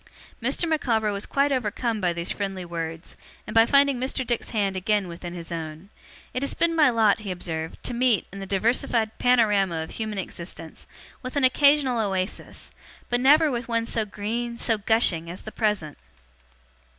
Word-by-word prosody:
Mr. 345 - +1
Micawber 230 -9 +1
was 200 0 -4
quite 280 +1 +2
overcome 235 -2 -1
by 180 -2 +2
these 170 0 -3
friendly 195 -3 -3
words, 165 -1 -6 0.3
and 210 - -7
by 225 0 +6
finding 280 -2 +4
Mr. 260 0 -1
Dick's 240 -1 -2
hand 200 -4 0
again 200 +1 0
within 175 +1 -7
his 170 -1 -8
own. 160 +2 -6 0.4
'It 255 - -2
has 280 - -2
been 335 0 +2
my 305 -4 +5
lot,' 225 -3 +3
he 210 -2 -7
observed, 160 -3 -4
'to - - +1
meet, 240 -4 +2
in 195 - -7
the 195 - -6
diversified 220 +2 +1
panorama 210 -8 +3
of 160 - -9
human 215 -2 -4
existence, 170 -3 -7 0.3
with 255 +2 -7
an 285 - +1
occasional 270 -1 +4
oasis, 190 -2 -3 0.4
but 245 - +2
never 300 +3 +5
with 240 -1 -3
one 230 -1 0
so 230 -1 0
green, 230 +3 -4
so 225 -2 +1
gushing, 200 -6 +2
as 180 - -7
the 215 - -8
present! 210 - -1
215 Hz, 175 wpm, -25 LUFS, 185-245 Hz, 0.4 s, by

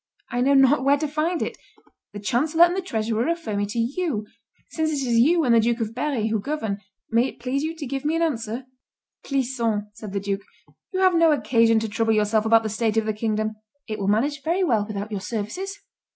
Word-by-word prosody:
I 245 - 0
know 275 +2 +4
not 270 0 +5
where 280 +1 +4
to 305 +1 -2
find 310 +4 -1
it. - - -5 0.5
The 205 - -7
chancellor 295 +10 +3
and 350 +1 -1
the 385 - -1
treasurer 225 -8 -1
refer 330 -7 -2
me 205 0 0
to 210 - -6
you. 240 - -1 0.5
Since 315 -1 0
it 280 -4 -2
is 230 -1 +3
you 325 +7 +4
and 245 -4 +3
the 230 - +6
Duke 235 +1 +1
of 225 -1 -3
Berry 250 -4 -1
who 220 -1 0
govern, 220 -5 -3 0.3
may 235 +3 +3
it - - -10
please 255 +3 -1
you 320 +2 -3
to 315 -3 -6
give 270 +1 -4
me 305 +2 0
an 335 - +1
answer." 240 -5 -2 0.6
"Clisson," 235 -6 -1
said 210 -1 -9
the 200 - -1
duke, 200 0 -2 0.5
"you 375 - -1
have 375 -1 +5
no 330 -1 +5
occasion 230 -4 +3
to 225 - -2
trouble 225 +1 +1
yourself 215 +1 +2
about 225 0 +5
the - - -1
state 220 0 0
of 220 - +2
the 215 - 0
kingdom; 215 0 -2 0.3
it 215 -2 -4
will 195 - -2
manage 275 +8 +1
very 345 +5 0
well 225 - +1
without 210 0 -5
your 200 -2 -3
services. 240 - -4
235 Hz, 225 wpm, -24 LUFS, 215-300 Hz, 0.6 s, the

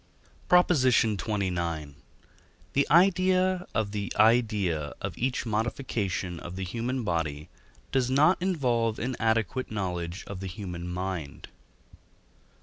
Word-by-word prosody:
PROP. 180 0 +6
XXIX. 100 - +1 0.8
The 140 0 +2
idea 185 +2 +3
of 105 -2 0
the 100 -1 -4
idea 105 - +2
of - - -4
each 125 +1 -1
modification 105 -5 -2
of 85 +2 -8
the 95 - -4
human 120 +7 -2
body 80 -4 -2 0.4
does 130 -2 +1
not 155 +7 +4
involve 120 - +1
an 125 +1 -2
adequate 115 +3 0
knowledge 90 -3 -3
of 100 -2 -7
the 95 - -5
human 90 -3 -6
mind. 90 -5 -5
110 Hz, 115 wpm, -28 LUFS, 90-130 Hz, 0.8 s, PROP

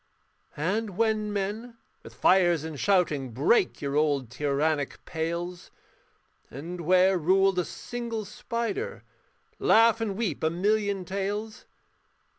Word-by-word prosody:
And 195 +5 -2
when 215 -2 +1
men, 210 +4 -4 0.2
with - - -13
fires 175 -4 +4
and 160 -3 -6
shouting, 155 - +1
Break 155 - +2
your 140 0 -2
old 145 -5 +1
tyrannic 145 +2 -1
pales; 170 +2 -4 0.8
And 170 +6 -7
where 185 +2 +4
ruled 190 +3 +3
a 175 - 0
single 235 -3 -5
spider 235 - -4 0.6
Laugh 225 0 +5
and 205 -4 -2
weep 220 -8 -2
a 160 - +3
million 200 +2 0
tales. 205 +3 -4
190 Hz, 115 wpm, -27 LUFS, 160-215 Hz, 0.8 s, Laugh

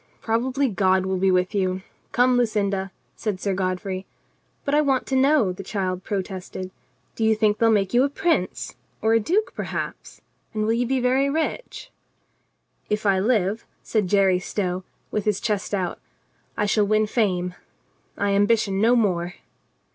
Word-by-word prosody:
Probably 255 +5 0
God 190 -3 +2
will 190 -1 -1
be 190 +1 +3
with 180 0 +2
you. 185 -2 0 0.3
Come, 250 +1 +4
Lucinda," 200 -5 0 0.3
said 210 -4 -3
Sir 200 0 -1
Godfrey. 185 0 -2 0.6
"But 280 - -1
I 300 - +5
want 270 -3 +1
to 265 - -2
know," 265 -6 +4
the 180 - -7
child 185 -2 -3
protested. 190 -2 -4 0.4
"Do 225 - -2
you 220 0 +4
think 215 -1 +2
they 230 - +4
will 225 - +5
make 195 -1 +1
you 245 - +5
a 280 - +2
prince? 285 - -1 0.3
Or 220 0 +4
a 225 - +5
duke, 370 - 0
perhaps? - - -5 0.4
And 215 - 0
will 225 - +2
you 240 +1 0
be 265 +1 +1
very 260 +3 +2
rich 320 - -3 0.5
?" - - -45
"If 210 0 -1
I 195 -2 +4
live," 210 -1 +1 0.2
said 215 -4 0
Jerry 190 -1 +3
Stow, 185 -1 -2 0.3
with 210 - -1
his 210 -3 +1
chest 210 -3 -2
out, 185 -4 -2 0.6
"I 210 - +1
shall 205 0 +2
win 215 +1 +3
fame. 185 -5 0 0.6
I 200 0 +1
ambition 205 -1 +2
no 235 +3 +5
more." 180 -6 +1
210 Hz, 170 wpm, -24 LUFS, 190-235 Hz, 0.6 s, I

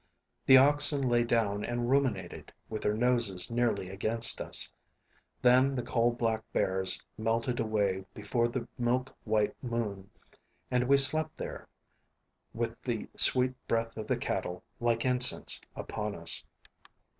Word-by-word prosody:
The 130 - +8
oxen 145 +1 +4
lay 120 -2 +2
down 110 -3 -1
and 120 0 -3
ruminated, 130 -10 -2 0.2
with 110 -1 -5
their 105 - -1
noses 115 -6 -1
nearly 115 -6 -1
against 110 +4 +2
us. - - +3 0.7
Then 130 +2 +4
the 125 - -3
coal 115 +1 0
black 115 -2 -2
bears 95 0 +1
melted 115 +2 -1
away 100 -4 -1
before 115 +3 -1
the 120 0 -5
milk 125 +2 -1
white 105 -1 0
moon, 105 -5 -4 0.6
and 125 0 +1
we 140 +1 +5
slept 155 +3 +5
there, - - -8 0.8
with - - -5
the - - -4
sweet 130 0 +5
breath 115 0 -2
of 110 - -7
the - - 0
cattle, 90 0 -4 0.2
like 120 0 -1
incense, 125 0 +2
upon 105 -1 -5
us. 85 0 -2
115 Hz, 135 wpm, -29 LUFS, 105-125 Hz, 0.8 s, The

